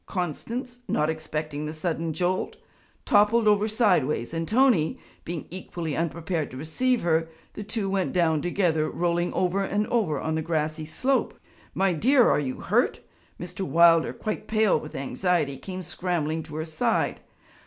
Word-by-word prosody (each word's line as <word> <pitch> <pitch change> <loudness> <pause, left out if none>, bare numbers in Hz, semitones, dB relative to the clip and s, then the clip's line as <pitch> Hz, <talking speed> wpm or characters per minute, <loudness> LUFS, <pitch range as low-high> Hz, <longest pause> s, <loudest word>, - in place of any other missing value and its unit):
Constance, 235 - -4
not 155 +1 +1
expecting 155 -1 -4
the 155 - -5
sudden 165 0 -2
jolt, 180 +3 -1 0.5
toppled 215 +2 +4
over 210 0 +4
sidewise, 180 - +1
and 165 0 -2
Tony, 230 - +3 0.3
being 170 -2 -5
equally 170 -4 -5
unprepared 165 -1 -2
to 130 - -9
receive 240 - 0
her, 165 -1 +1 0.2
the - - -7
two 210 0 -2
went 190 -1 0
down 160 -4 +2
together 170 -3 +1
rolling 175 0 0
over 185 +2 +1
and 205 +2 0
over 185 - +1
on 160 - -2
the 160 - 0
grassy 155 -1 -2
slope. 260 - 0 0.4
'My 190 -1 +2
dear, 245 - +4
are - - +3
you 130 -3 -4
hurt?' - - +1 0.4
Mr. 175 +2 -8
Wilder, 170 -2 +5
quite 215 - -5
pale 215 -6 +3
with 150 - -10
anxiety, 140 0 -1
came 185 +2 -6
scrambling 165 -4 -2
to 155 -1 -10
her 155 0 -3
side. 160 -1 0
170 Hz, 155 wpm, -26 LUFS, 155-200 Hz, 0.5 s, Wilder